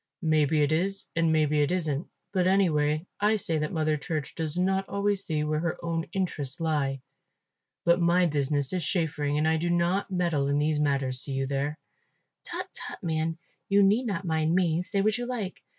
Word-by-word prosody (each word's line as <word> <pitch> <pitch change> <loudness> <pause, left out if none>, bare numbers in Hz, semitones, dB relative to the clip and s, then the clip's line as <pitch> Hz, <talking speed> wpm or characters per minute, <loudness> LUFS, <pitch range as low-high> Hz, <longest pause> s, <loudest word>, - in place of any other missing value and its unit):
"Maybe 155 -1 +3
it 145 - +1
is 195 +5 0
and 165 -1 +2
maybe 150 -1 +2
it 145 - +1
isn't; 160 -4 -1 0.3
but 185 -2 +2
anyway 155 -5 +2
I 210 +2 +3
say 165 -6 -1
that 150 0 -2
Mother 155 -2 +1
Church 150 0 -4
does 160 0 -4
not 190 +1 +1
always 200 0 0
see 155 -4 -1
where 155 0 0
her 165 0 -2
own 165 -1 -2
interests 160 -9 -2
lie. 145 -5 0 0.8
But 170 +1 +4
my 175 +1 +4
business 145 -2 0
is 180 -2 -1
chaffering 150 -4 0
and 155 +1 +2
I 160 0 +3
do 170 +2 -1
not 175 +3 +1
meddle 170 -7 0
in 140 +1 +1
these 150 0 +1
matters, 135 -3 0
see 140 - -5
you 135 0 0
there." 140 +2 -2 0.7
"Tut, - - -5
tut, - - -6
man, 160 -1 -1 0.3
you 200 0 +5
need 215 +6 +3
not 195 -3 -3
mind 160 0 +1
me, 175 -2 +2
say 195 +2 -1
what 215 +3 +1
you 245 - -3
like. 220 -7 -4
160 Hz, 195 wpm, -27 LUFS, 150-185 Hz, 0.8 s, you